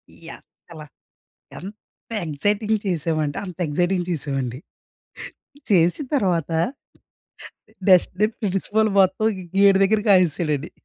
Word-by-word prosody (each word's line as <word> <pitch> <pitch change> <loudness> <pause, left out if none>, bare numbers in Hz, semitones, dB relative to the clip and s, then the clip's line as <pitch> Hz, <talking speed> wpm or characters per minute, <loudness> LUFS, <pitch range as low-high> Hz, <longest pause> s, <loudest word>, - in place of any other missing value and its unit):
ఈ - - -17 0.2
అసల 160 -2 -16 0.8
ఎంత 205 +5 -14 0.2
ఎక్సైటింగ్ 205 +8 0
చేశామంటే 155 -4 -1
అంత 180 -3 -9
ఎక్సైటింగ్ 175 +3 0
చేశామండి. 135 -6 -3 1.1
చేసిన 180 - +2
తర్వాత 175 - 0 1.4
నెక్స్ట్‌డే, 185 +2 +4
ప్రిన్సిపాల్ 210 +2 0
మొత్తం 190 +3 +3 0.3
గేటు 200 -1 +6
దగ్గర 210 +2 +2
కాయిసాడండి. 165 -5 +2
180 Hz, 90 wpm, -22 LUFS, 155-200 Hz, 1.4 s, గేటు